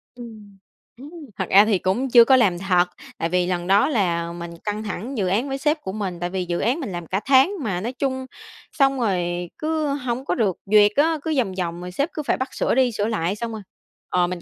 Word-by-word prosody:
Ừm. 215 -5 -12 0.4
Ừm, 280 +4 -11 0.3
thật - - -1
ra 200 +2 +7
thì 210 -4 +2
cũng 240 +8 -1
chưa 235 -1 +8
có 265 - +6
làm 195 -8 +3
thật. 180 -2 +2 0.3
Tại 165 - -2
vì 180 0 +1
lần 175 -1 -2
đó 200 +8 +4
là 170 - 0
mình 170 0 -7
căng 210 +1 -3
thẳng 220 +5 -5
dự 190 -3 0
án 220 +9 0
với 270 - -2
sếp 300 +2 0
của 190 - -5
mình. 190 -4 -4
Tại 175 0 -2
vì 185 -1 -3
dự 175 0 -2
án 260 +8 0
mình 255 -10 -5
làm 175 -2 -6
cả 195 - -1
tháng, 270 +6 +5
mà 185 -5 -2
nói 240 +4 -4
chung 260 -1 -2 0.5
xong 275 -3 +2
rồi 175 -5 -1
cứ 310 -1 -1
hổng 255 -1 -4
có - - 0
được 205 -7 0
duyệt 210 +1 +5
á, 315 +3 +3
cứ 320 - -1
vòng 205 -7 0
vòng, 170 0 -3
rồi 180 0 -7
sếp 280 - -1
cứ 305 - -4
phải - - 0
bắt 260 0 -4
sửa - - 0
đi 255 -2 +3
sửa 210 0 -1
lại, 195 -3 -1
xong 230 +1 -5
rồi 220 -1 -6 0.5
ờ, 180 -1 +2
mình 180 -1 -5
210 Hz, 245 wpm, -22 LUFS, 180-260 Hz, 0.5 s, chưa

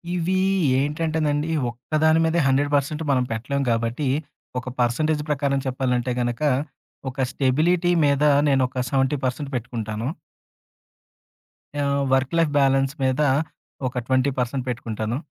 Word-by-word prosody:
ఇవి 180 +2 0 0.4
ఏంటంటేనండి, 150 +1 0 0.2
ఒక్కదాని 155 +6 +1
మీదే 160 +1 +1
100% 145 +3 +1
మనం 130 -2 +2
పెట్టలేం 140 +5 -2
గాబట్టి, 115 +5 -1 0.5
ఒక 125 - -7
పర్సెంటేజ్ 150 +6 +1
ప్రకారం 140 -1 +1
చెప్పాలంటే 125 -1 -1
గనక, 120 +2 -2 0.7
ఒక 130 - -21
స్టెబిలిటీ 165 +7 +2
మీద 140 0 +2 0.3
నేనొక 130 -1 +1
70% 135 0 0
పెట్టుకుంటాను... 115 -2 -4 1.8
ఆహ్, 140 0 +1
వర్క్ 135 +3 +1
లైఫ్ 165 -3 +2
బ్యాలన్స్ 135 0 +2
మీద 130 +2 +1 0.7
ఒక 125 -1 -4
20% 130 -1 0
పెట్టుకుంటాను. 115 -1 -3
135 Hz, 105 wpm, -23 LUFS, 125-150 Hz, 1.8 s, మనం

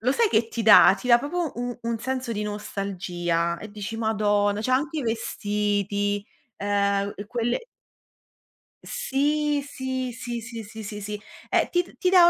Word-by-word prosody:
lo 250 +4 +2
sai 460 +8 +3
che 225 - +2
ti 230 0 -3
dà? 215 -2 +9
Ti 250 - -6
dà 235 -1 +8
proprio 315 +4 -2
u 245 0 -4
un 230 0 -1
senso 255 +1 -3
di 210 -1 -2
nostalgia 180 -5 -2
e 215 - -9
dici: 210 +2 -5
"Madonna!" 205 -2 +1
Cioè 225 - -1
anche 295 +5 +1
i - - -1
vestiti, 205 -2 -1 0.3
ehm, 200 0 +1
u - - -6
e 205 - -7
quelle 240 +1 0 1.3
Sì, 295 - 0
sì, 260 -2 -3
sì, 240 0 -5
sì, 230 0 -7
sì, 220 +1 -9
sì, 210 0 -6
sì. 210 +1 -4 0.3
Ehm, - - +2
ti 355 - +3
d 355 - -16
ti 365 - +2
dà 360 -2 +8
225 Hz, 175 wpm, -25 LUFS, 205-260 Hz, 1.3 s, dà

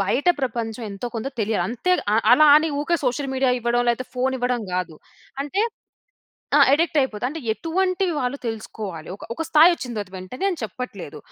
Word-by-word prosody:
బయట 245 - -1
ప్రపంచం 230 -2 -3
ఎంతో 200 +5 -5
కొంత 225 +5 -3
తెలియాలి. 215 +1 0
అంతే 250 +10 0 0.2
ఆహ్, 225 - +3
అలా 305 +4 +7
అని 315 +1 +3
ఊరికే 340 +3 +1
సోషల్ 265 +2 -1
మీడియా 260 -1 +2
ఇవ్వడం 240 +1 +1
లేకపోతే 245 +2 -2
ఫోన్ 260 +1 0
ఇవ్వడం 245 -2 0
గాదు. 180 -3 -2 0.5
అంటే 380 +9 -1 1.0
ఆ! - - +5
అడిక్ట్ 320 +2 +2
అయిపోతుంది. 245 -4 -1
అంటే 320 +4 -6
ఎటువంటి 370 - 0
వాళ్ళు 255 +1 -1
తెలుసుకోవాలి. 215 -7 -6
ఒక - - -13
ఒక 325 - -3
స్థాయి 325 +2 +7
వచ్చిన 255 -7 -6
తరువాత 200 -2 -5
వెంటనే 185 - -5
అని 355 - -4
చెప్పట్లేదు. 205 - -6
250 Hz, 175 wpm, -23 LUFS, 220-300 Hz, 1.0 s, అలా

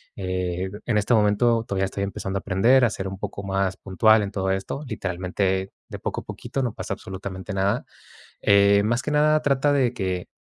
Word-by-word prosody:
eh, 90 -1 -2 0.2
en 115 -3 +1
este 105 +3 +2
momento 115 +2 +3
todavía 95 -1 0
estoy 100 +1 -4
empezando 100 0 -3
a - - 0
aprender 115 +8 +3
a - - +3
ser 95 -2 -4
un 95 0 -6
poco 100 - -5
más 95 -1 -1
puntual 110 +3 +3
en 100 - -4
todo 95 -1 -2
esto. 95 +9 -3
Literalmente, 95 -1 -2 0.2
de - - -7
poco - - -3
a - - -17
poquito 135 - -4
no 120 -4 -2
pasa - - -4
absolutamente 95 +1 -7
nada. 100 +4 0 0.6
Eh, 100 0 +5
más 120 +4 +1
que - - -3
nada, 155 +1 +4
trata 140 +1 +2
de 130 -4 +2
que 95 -6 -3
100 Hz, 195 wpm, -24 LUFS, 95-115 Hz, 0.6 s, Eh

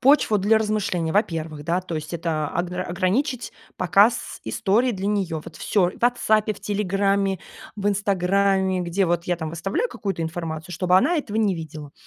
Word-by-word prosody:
почву 260 -5 +4
для 210 +3 +3
размышлений. 205 -6 -1
Во-первых, 165 -7 -1
да, 175 +4 +1
то 175 -2 -6
есть 155 +2 -5
это 160 -3 -1
огра 175 +3 -2
ограничить 200 - -1 0.2
показ 200 +6 +2
историй 230 +6 +1
для 195 0 -4
нее: 190 -6 -1
вот - - -10
всё 185 -4 +1
в - - -15
"Ватсапе", 220 -3 +2
в - - -15
"Телеграме", 195 -1 0 0.4
в 205 0 -3
"Инстаграме", 195 -1 +1
где 180 +2 0
вот 170 0 0
я 175 -1 0
там 160 -2 -4
выставляю 195 - -1
какую-то 195 - -4
информацию, 160 0 -5
чтобы 180 +1 +3
она 295 - +3
этого 220 -9 -3
не 210 -4 +2
видела. 155 -3 -8
190 Hz, 170 wpm, -23 LUFS, 170-210 Hz, 0.4 s, почву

